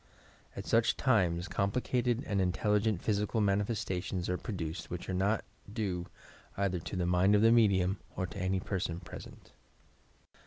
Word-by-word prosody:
At - - -5
sueh 115 -1 +3
times 90 -8 +2
complicated 120 +4 0
and 100 -3 0
intelligent 105 +2 +1
physical 105 +1 0
mani 100 -1 +2
festations 95 -4 -3
are 90 - 0
produced 85 -7 -5
which 90 0 -5
are 95 - -2
not 100 +4 +1 0.3
due 95 -5 -2 0.5
either 95 -3 0
to 85 - -6
the 90 -1 0
mind 90 +3 +4
of 105 - +4
the 115 - +7
medium 100 -4 +4 0.2
or 95 - -1
to 100 +3 -8
any 95 0 0
person 90 -3 -2
present. 90 - -11
100 Hz, 155 wpm, -32 LUFS, 90-110 Hz, 0.5 s, the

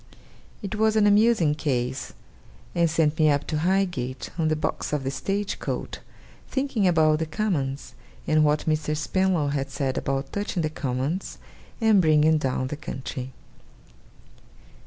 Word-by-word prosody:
It 200 - -4
was 220 0 +2
an 215 -1 +4
amusing 205 -6 +4
case; 130 -4 -2 0.6
and 170 -1 +2
sent 155 -1 +1
me 155 -1 +5
up 145 -1 +1
to 155 - -2
Highgate, 175 -8 -1
on 165 -2 0
the 155 - +2
box 155 - -3
of 145 -2 0
the 135 - -2
stage 200 +7 -2
coach, - - -4 0.5
thinking 265 -7 0
about 155 -3 +3
the 160 - -2
Commons, 155 -8 -2 0.3
and 155 0 +3
what 150 0 +2
Mr. 155 -1 0
Spenlow 180 -2 +1
had 140 -1 -2
said 135 -3 -2
about 135 0 -3
touching 200 -4 -2
the 155 - -1
Commons 140 +6 -3 0.4
and 220 -4 +5
bringing 155 -1 +4
down 130 -2 -1
the 150 - -4
country. 130 -2 -6
155 Hz, 150 wpm, -25 LUFS, 140-190 Hz, 0.6 s, me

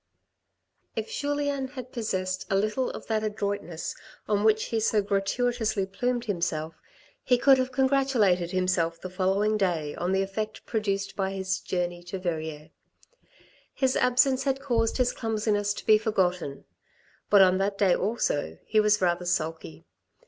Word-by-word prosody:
If - - -4
Julien 285 - -1
had 255 -2 -9
possessed 185 -5 -2
a 195 - +1
little 215 +6 0
of - - -8
that 220 -1 -1
adroitness 200 -6 -3 0.3
on 205 -1 +1
which 220 0 +3
he 230 - 0
so 215 -1 +2
gratuitously 210 +1 0
plumed 245 +5 -2
himself, 170 -5 -2 0.5
he 250 - +3
could 265 +1 +5
have 255 0 -1
congratulated 255 -10 +2
himself 185 -2 0
the 185 - -7
following 195 +3 +1
day 170 -7 0
on 175 +2 -2
the 190 0 +2
effect 215 +2 -5
produced 200 -3 -2
by 195 -1 -1
his 190 -1 -2
journey 175 -1 -3
to 175 +2 -5
Verrieres. 160 -3 -4 1.0
His 265 -1 +1
absence 255 +1 +3
had 270 -1 +1
caused 235 -5 0
his 250 -1 +2
clumsiness 210 -3 -1
to - - -8
be 215 -1 +6
forgotten. 180 -9 -1 0.6
But 200 -2 +7
on 185 0 +3
that 200 +1 0
day 195 -3 +4
also 150 - -1
he 215 - +2
was 210 -2 +3
rather 175 0 +1
sulky. 160 - -3
205 Hz, 150 wpm, -27 LUFS, 185-235 Hz, 1.0 s, But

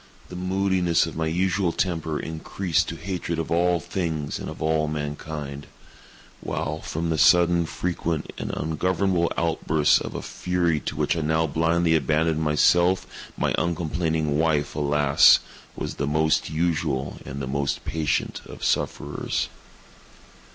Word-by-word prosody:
The 90 - -8
moodiness 90 -2 +1
of 80 - -7
my 80 0 -1
usual 90 +2 +1
temper 80 -4 -1
increased 80 +2 -1
to - - -5
hatred 90 -2 -4
of 80 0 -3
all 85 +1 +3
things 80 -3 -3
and - - -5
of - - -8
all 80 -1 +1
mankind; 75 -1 -5 0.7
while, 75 +1 -3
from 80 +1 -3
the 80 - 0
sudden, 85 +1 +5
frequent, 85 -2 -3
and - - -4
ungovernable 90 +2 0
outbursts 80 -2 +2
of - - -6
a - - -4
fury 85 -3 0
to - - -5
which - - +1
I 80 - -1
now 80 +1 +1
blindly 80 +2 +2
abandoned 80 +2 +1
myself, 85 +4 +3 0.3
my - - 0
uncomplaining 80 -3 -1
wife, 80 -3 +1
alas, 75 -1 +5 0.4
was - - -4
the 70 - -1
most 80 +2 +1
usual 80 -4 -1
and 70 +1 -7
the 70 - -3
most 70 +1 -2
patient 80 -2 -1
of - - -10
sufferers. - - -1
80 Hz, 140 wpm, -24 LUFS, 75-85 Hz, 0.7 s, sudden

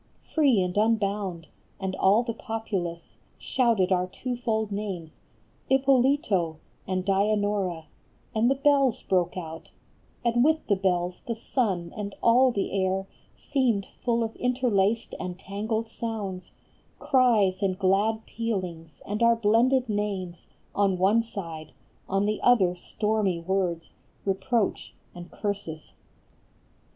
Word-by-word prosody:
Free 280 -9 +4
and 180 0 -3
unbound! 200 -5 0 0.3
and 190 -1 -3
all 205 +5 +4
the 235 -1 -3
populace 195 -7 -4 0.2
Shouted 225 -7 +1
our 180 0 +2
twofold 225 -1 -2
names, 195 -6 -5 0.3
" - - -36
Ippolito 260 - +3 0.3
And 185 -1 -1
Dianora," 200 -4 +1 0.5
and 225 +2 +3
the 270 - +3
bells 275 -3 +2
broke 180 -1 0
out, 165 -2 -7 0.6
And 240 +1 +3
with 315 +2 +2
the 200 - +2
bells 180 -2 -1
the 230 - -1
sun 195 -8 -1
and 205 -2 -5
all 250 +3 +6
the 200 -4 -2
air 190 0 0 0.3
Seemed 245 -8 0 0.2
full 235 -1 +2
of 225 0 -4
interlaced 230 -4 +1
and 180 -1 -5
tangled 215 +4 -3
sounds, 210 -6 -5 0.4
Cries 220 -8 +3
and 190 -2 0
glad 205 +4 +1
pealings 180 -9 -4
and 210 +2 -3
our 235 0 +5
blended 235 +4 +3
names 200 -4 -3 0.3
On 195 -2 +2
one 200 +5 +4
side; 165 -9 -7 0.4
on 195 +1 +1
the 210 0 0
other 200 -8 +4
stormy 210 -1 -1
words, 175 -1 -1 0.3
Reproach, 200 +3 -1 0.2
and 175 0 -10
curses. 200 -7 -5
205 Hz, 125 wpm, -26 LUFS, 185-230 Hz, 0.6 s, all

